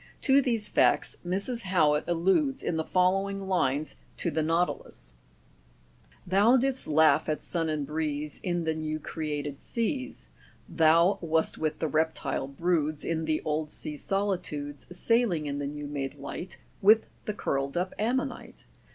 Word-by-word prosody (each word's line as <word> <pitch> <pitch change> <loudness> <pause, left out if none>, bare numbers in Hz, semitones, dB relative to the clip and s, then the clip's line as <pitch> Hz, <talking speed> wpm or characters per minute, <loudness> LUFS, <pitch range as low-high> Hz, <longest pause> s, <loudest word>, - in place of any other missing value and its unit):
To 275 0 +5
these 230 -5 -1
facts - - +2
Mrs. 200 +7 -2
Howitt 160 -7 +2
alludes 190 - +1
in 170 - -1
the 160 - 0
following 195 +3 +1
lines 155 -5 0 0.2
to 170 - -1
the 160 - 0
nautilus: 165 - -2 1.1
"Thou 205 +7 +5
didst 265 +1 -1
laugh 155 +1 +4
at 155 - 0
sun 165 -2 -2
and 150 -2 -1
breeze 150 -1 -3
In 175 -2 -1
the 160 0 0
new 155 0 -3
created 150 -2 -4
seas; 260 +3 -3 0.2
' - - -30
Thou 170 +4 +4
wast 160 -1 0
with 155 -1 -1
the 160 - -1
reptile 155 -4 -1
broods 155 0 -1
In 160 -1 -1
the 155 -1 0
old 155 0 -1
sea 150 - -7
solitudes, 150 -8 -3
Sailing 180 -3 +1
in 140 0 -3
the 140 - -2
new 150 +1 -6
made 140 -1 -4
light, 145 +5 -7 0.2
With 215 +3 +6 0.2
thecurled 140 -9 -2
up 180 +1 -1
ammonite. 260 +5 -2
160 Hz, 150 wpm, -28 LUFS, 150-195 Hz, 1.1 s, With